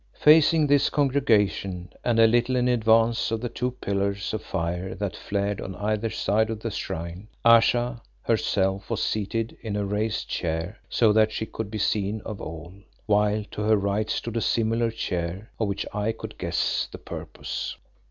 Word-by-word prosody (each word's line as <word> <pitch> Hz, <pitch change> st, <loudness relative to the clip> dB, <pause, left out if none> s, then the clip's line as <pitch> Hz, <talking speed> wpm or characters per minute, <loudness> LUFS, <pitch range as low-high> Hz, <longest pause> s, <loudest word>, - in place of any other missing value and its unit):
Facing 155 Hz, +1 st, +6 dB
this 145 Hz, -1 st, +4 dB
congregation 105 Hz, -10 st, +1 dB
and 120 Hz, -2 st, +1 dB
a 115 Hz, -, +8 dB
little 120 Hz, +3 st, +3 dB
in 125 Hz, 0 st, +2 dB
advance 115 Hz, -1 st, +3 dB
of 115 Hz, 0 st, -1 dB
the 120 Hz, +1 st, -3 dB
two 125 Hz, +2 st, -2 dB
pillars 100 Hz, -5 st, -2 dB
of 110 Hz, -, -2 dB
fire 90 Hz, +1 st, -3 dB
that 100 Hz, -1 st, -3 dB
flared 100 Hz, 0 st, -2 dB
on 95 Hz, -, -6 dB
either 105 Hz, +2 st, -1 dB
side 110 Hz, +1 st, +1 dB
of 110 Hz, -1 st, -3 dB
the 115 Hz, -, -3 dB
shrine, 85 Hz, +2 st, -5 dB, 0.2 s
Ayesha 120 Hz, +1 st, +4 dB, 0.2 s
herself 95 Hz, -3 st, 0 dB
was -, -, -1 dB
seated 110 Hz, +2 st, -2 dB
in 110 Hz, -3 st, -4 dB
a 105 Hz, -1 st, -1 dB
raised 105 Hz, +2 st, -1 dB
chair 80 Hz, +4 st, -3 dB
so 110 Hz, -3 st, +4 dB
that 110 Hz, 0 st, +4 dB
she 110 Hz, -, -3 dB
could 110 Hz, -1 st, -5 dB
be 110 Hz, -, -4 dB
seen 105 Hz, +1 st, 0 dB
of 105 Hz, -1 st, -7 dB
all, 80 Hz, +2 st, -7 dB, 0.3 s
while 105 Hz, 0 st, +2 dB
to -, -, -5 dB
her 110 Hz, 0 st, +4 dB
right 100 Hz, +2 st, -1 dB
stood 115 Hz, -1 st, -2 dB
a -, -, 0 dB
similar 115 Hz, +3 st, +1 dB
chair 90 Hz, -2 st, -4 dB
of 110 Hz, -, +1 dB
which 100 Hz, -, -2 dB
I 105 Hz, +2 st, 0 dB
could -, -, -9 dB
guess -, -, 0 dB
the -, -, -7 dB
purpose. -, -, -6 dB
110 Hz, 175 wpm, -25 LUFS, 100-115 Hz, 0.3 s, a